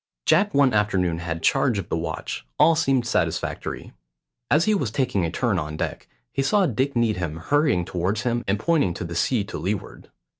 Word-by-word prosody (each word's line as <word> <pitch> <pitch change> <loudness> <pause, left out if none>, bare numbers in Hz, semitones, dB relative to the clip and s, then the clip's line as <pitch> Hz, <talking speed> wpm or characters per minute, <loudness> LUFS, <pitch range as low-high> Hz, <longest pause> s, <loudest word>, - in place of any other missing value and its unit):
Jack 205 +1 +4
one 140 -3 +4
afternoon 95 -5 +1
had 85 -1 -4
charge - - +2
of - - -5
the - - 0
watch; - - -4
all 165 +2 +5
seemed 135 -6 +1
satisfactory. - - -2 0.6
As 155 +4 +4
he 215 - +3
was 140 - 0
taking 110 -6 0
a - - -3
turn 105 0 0
on 75 -1 -5
deck, - - -4 0.2
he 135 - -1
saw 195 +8 +3
Dick 135 0 -1
Needham 90 -9 0
hurrying 140 - +1
towards 95 +7 -2
him 120 -1 0
and 100 +1 +1
pointing 140 - +1
to - - -5
the 85 0 -6
sea 105 +6 +1
to 100 - -7
leeward. 100 +3 -4
110 Hz, 190 wpm, -24 LUFS, 90-140 Hz, 0.6 s, all